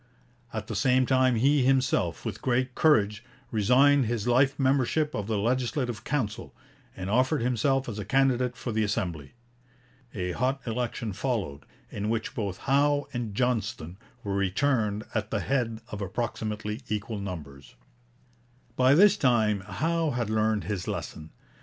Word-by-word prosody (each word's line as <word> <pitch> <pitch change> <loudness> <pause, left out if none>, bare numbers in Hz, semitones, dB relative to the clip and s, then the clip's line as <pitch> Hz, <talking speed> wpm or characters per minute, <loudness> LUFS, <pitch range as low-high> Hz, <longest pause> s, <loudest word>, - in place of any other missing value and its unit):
At 110 -1 -4
the 110 - -5
same 130 +3 +3
time 130 -1 +3
he 140 +5 +3
himself, 130 0 +1
with - - -4
great 130 0 0
courage, 105 -9 +3 0.3
resigned 130 +4 +4
his 115 -1 -2
life 135 +3 +3
membership 140 +3 +1
of 105 -1 -3
the 110 -2 0
Legislative 120 +2 -1
Council, 125 -8 -3 0.4
and 95 -1 -5
offered 130 +5 +2
himself 130 +2 +1
as 110 -3 -5
a - - -3
candidate 125 +2 +1
for 120 - -4
the 110 0 +1
Assembly. 90 -7 -3 0.8
A 90 -3 -2
hot 130 +7 0
election 115 -2 -3
followed, 100 - -3 0.2
in 105 +1 -3
which 115 0 -2
both 100 -4 -3
Howe 145 +1 +3
and 115 -5 -4
Johnston 110 -8 -1 0.3
were 100 - -3
returned 105 +2 0
at 110 -2 -2
the 110 -2 -1
head 115 -4 -1
of 105 - -6
approximately 105 +2 -3
equal 105 0 -3
numbers. 75 -8 -8 1.0
By 130 +2 +5
this 200 +4 +6
time 110 -6 +2
Howe 160 - -1
had 120 -5 -2
learned 110 -2 +1
his 95 0 -4
lesson. 80 0 -5
115 Hz, 145 wpm, -27 LUFS, 105-130 Hz, 1.0 s, this